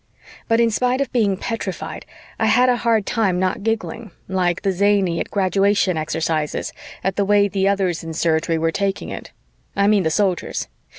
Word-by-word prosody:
But 230 0 +2
in 230 -1 +3
spite 250 +3 +1
of 275 - -1
being 210 -6 +1
petrified, 215 -3 -5 0.3
I 220 - +2
had 245 +4 +4
a 245 - +3
hard 225 -3 +1
time 205 -6 +1
not 185 +2 0
giggling, 225 +1 -3 0.2
like 180 -1 0
the 195 - +2
zany 190 -2 +2
at - - -3
graduation 195 -1 +2
exercises, 155 -1 -2 0.3
at 190 0 -1
the 200 - +3
way 205 0 +4
the 195 -1 0
other 200 -1 +2
ones 175 -3 -2
in 165 -1 -6
Surgery 165 0 +1
were 165 0 +1
taking 195 +2 -2
it. - - -7 0.4
I 200 - +2
mean 205 -1 +4
the 160 - +1
Soldiers. 185 +2 -1
195 Hz, 185 wpm, -21 LUFS, 180-215 Hz, 0.4 s, had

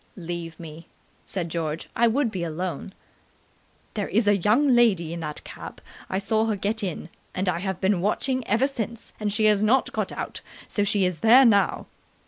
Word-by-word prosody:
"Leave 170 -2 -6
me," 165 0 -10 0.4
said 180 -3 -3
George, 160 -1 -3
"I 235 +1 +4
would 240 +1 +1
be 185 -4 -3
alone." 175 +3 -4 1.0
"There 205 -2 -2
is 220 +1 +1
a 205 - +5
young 220 +10 +3
lady 210 -10 +3
in 170 - -5
that 150 -2 -5
cab. - - -9 0.3
I 190 - -1
saw 215 +3 +1
her 220 - 0
get 210 +3 -2
in, 180 -4 -4 0.3
and 190 +1 -1
I 175 -2 +1
have 190 -1 -3
been 190 -2 +1
watching 255 +6 0
ever 230 +5 +3
since, 235 -4 -5
and 210 -1 -1
she 215 +1 +1
has 210 -1 +4
not 235 +5 +3
got - - -2
out, - - -5 0.3
so 205 - 0
she 200 -1 +2
is 180 -3 -2
there 245 - +7
now." 200 -4 +3
200 Hz, 190 wpm, -25 LUFS, 175-225 Hz, 1.0 s, there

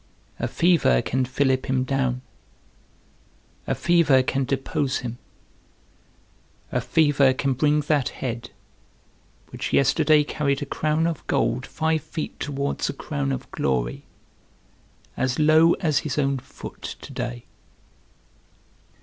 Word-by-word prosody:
A - - -1
fever 170 - +3
can 130 +1 0
fillip 130 0 0
him 130 -1 +1
down, 130 -2 -1 1.4
a - - 0
fever 160 -6 +4
can 135 +1 0
depose 135 +1 -1
him; 120 -1 -6 1.5
a - - 0
fever 145 -4 +3
can 135 0 0
bring 150 +3 +2
that 145 -2 +1
head, 120 -2 -5 1.0
which - - -4
yesterday 150 +2 +4
carried 140 -2 -1
a - - -4
crown 155 +1 0
of 165 -2 -2
gold 125 +2 0
five 160 -1 0
feet 155 +2 -6
towards 140 -1 -2
a - - -2
crown 70 -1 -3
of 65 - -5
glory, 60 -3 -1 1.1
as 125 -1 -1
low 155 +2 +5
as 155 -6 +1
his 150 -3 -4
own 135 -2 +1
foot 130 - -11 0.2
to - - -10
day. - - -5
140 Hz, 125 wpm, -24 LUFS, 130-155 Hz, 1.5 s, low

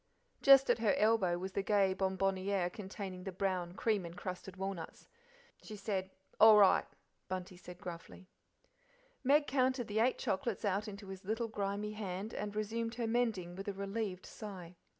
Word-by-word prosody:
Just 275 -1 +7
at - - +1
her 220 -3 +3
elbow 210 -5 +3
was 190 +2 -5
the 200 - -1
gay 195 -1 +3
bonbonniere 190 -1 0
containing 190 -3 -7
the 190 - -4
brown, 185 -2 -2
cream 215 -3 +1
encrusted 180 +2 -7
walnuts. 190 -4 -5 0.5
"She 215 - -8
said, 195 -2 -2 0.3
'All 220 -1 +9
right,'" 200 -2 +5
said - - -36
Bunty 185 -1 -6
gruffly. 180 0 -9 1.0
Meg 290 +3 +4
counted 260 -3 +1
the 215 +1 -1
eight 245 +3 +3
chocolates 215 +3 -2
out 200 +2 0
into 200 -1 -8
his 190 0 -8
little 225 +4 -2
grimy 205 0 -2
hand, 205 0 -5
and 210 0 -4
resumed 230 +2 -2
her 235 0 -2
mending 225 -7 0
with 195 +2 -7
a 200 - -1
relieved 195 -1 -4
sigh. 185 -5 -9
200 Hz, 160 wpm, -34 LUFS, 185-220 Hz, 1.0 s, All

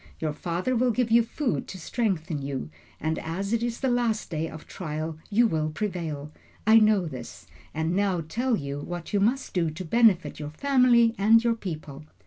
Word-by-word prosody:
Your 155 -2 -2
father 175 +10 -2
will 250 +2 +3
give 240 0 0
you 235 +1 +7
food 240 +3 -2
to 190 - -7
strengthen 175 - -2
you, 135 - -4 0.3
and 160 +1 -1
as 195 +6 -3
it 230 - +1
is 235 0 -3
the 265 - +1
last 240 -5 0
day 160 0 -2
of 160 -1 -10
trial 155 -2 -5
you 230 +4 +4
will 155 -7 0
prevail. 160 -5 -4 0.3
I 220 +1 +7
know 215 -4 +4
this, 130 -7 -8 0.3
and 160 +3 -1
now 195 -3 +1
tell 245 +7 0
you 140 -1 -4
what 175 +5 -6
you 205 - +3
must 245 +7 0
do 170 -3 +1
to 160 +4 -7
benefit 220 -2 +3
your 150 -1 -5
family 245 - +4
and 225 +3 +5
your 235 -1 +3
people. 155 -8 -7
185 Hz, 190 wpm, -26 LUFS, 155-230 Hz, 0.3 s, you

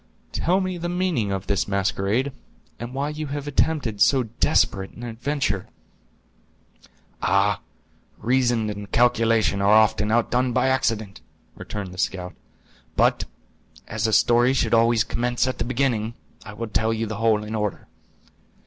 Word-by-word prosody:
"Tell 185 +3 +1
me 185 -2 -3
the 175 +1 -3
meaning 175 - 0
of 95 0 -3
this 100 0 0
masquerade; 100 +6 0 0.5
and 120 +2 -7
why 140 +2 -1
you 150 0 -5
have 145 0 -5
attempted 140 -7 0
so 130 +2 +5
desperate 100 -3 +1
an 120 - -11
adventure?" 120 -3 -2 1.5
"Ah, 100 0 +2 0.6
reason 120 -2 +1
and 105 0 -8
calculation 115 -4 +2
are 100 - +3
often 110 -1 +4
outdone 125 +2 +1
by 130 - +2
accident," 110 -6 -1 0.3
returned 100 -3 -6
the 90 - -10
scout. 90 -2 -2 0.6
"But, - - +2 0.6
as 110 +1 -1
a 110 - -1
story 120 +4 +4
should 135 - 0
always 115 0 +4
commence 120 +3 -1
at 130 - -3
the - - -1
beginning, 120 -3 -1 0.3
I 105 - -9
will 115 +1 -5
tell 110 +1 +1
you 115 0 -1
the 110 -1 -5
whole 110 -1 +2
in 105 +1 -6
order. 105 -3 -3
115 Hz, 150 wpm, -23 LUFS, 105-130 Hz, 1.5 s, so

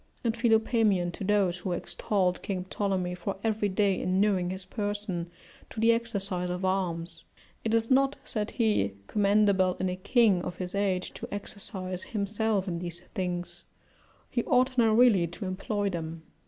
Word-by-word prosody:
And 230 -2 +1
Philopaemen, 220 -5 +2
to 185 - -7
those 190 -3 +2
who 180 0 -2
extolled 180 +1 -1
King 185 -2 -3
Ptolemy 190 -3 -1
for 180 +2 -4
every 215 -2 +1
day 195 0 +1
inuring 185 -1 +2
his 190 0 -5
person 205 -4 -3 0.4
to - - -7
the 225 +1 +5
exercise 200 -6 -1
of 180 +1 -2
arms: 180 -3 -2 0.4
"It 225 0 +1
is 230 +2 +1
not," 275 +1 +4
said 210 -1 -1
he, 210 - +1
"commendable 200 - +3
in 185 - 0
a 180 - -2
king 200 0 +3
of 175 - -5
his 180 -1 -5
age 195 -2 0
to - - -8
exercise 190 -2 -5
himself 210 -1 -1
in 170 -2 -2
these 175 -1 -2
things; 175 -3 -3 0.7
he 240 - 0
ought 255 0 +3
now 230 -3 +4
really 220 -8 +5
to 175 +5 -7
employ 200 +2 -2
them." 165 -1 -5
195 Hz, 160 wpm, -28 LUFS, 180-215 Hz, 0.7 s, the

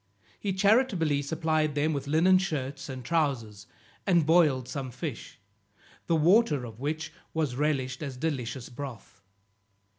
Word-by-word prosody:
He 200 - -2
charitably 190 - +3
supplied 155 0 0
them 155 +2 +1
with 140 -1 -4
linen 175 +5 +5
shirts 140 -8 -3
and 130 -2 -7
trowsers, 120 -11 -1 0.4
and 175 -5 +4
boiled 155 -6 +4
some 135 -2 -4
fish, 125 +1 -6 0.7
the 170 - +3
water 160 - +4
of 115 -1 -10
which 155 +3 -3 0.2
was 150 -6 0
relished 135 -3 -1
as 135 -4 -5
delicious 130 -4 -3
broth. 120 -5 -9
145 Hz, 130 wpm, -28 LUFS, 130-160 Hz, 0.7 s, linen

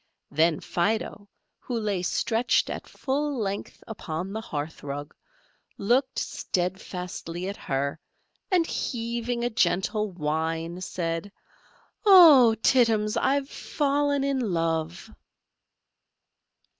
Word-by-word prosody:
Then 160 +2 +2
Fido, 205 +2 -2 0.3
who 240 -2 -3
lay 205 -4 -1
stretched 225 +6 +1
at - - -6
full 285 +1 -2
length 200 -2 -4
upon 185 -3 -5
the 220 - -3
hearth 155 -6 -5
rug, 145 +1 -6 0.6
looked 255 +6 +1
steadfastly 180 -1 -3
at 200 - -4
her, 140 0 -2 0.5
and 360 -3 +3
heaving 235 -3 -3
a 240 - +1
gentle 210 0 +1
whine, 165 +1 -2
said, 170 +1 -3 0.7
"Oh, 315 - +8
Tittums, 225 -4 +3
I've 275 +1 +1
fallen 285 -1 0
in 275 -1 0
love!" 165 -2 -2
205 Hz, 100 wpm, -26 LUFS, 165-245 Hz, 0.7 s, Oh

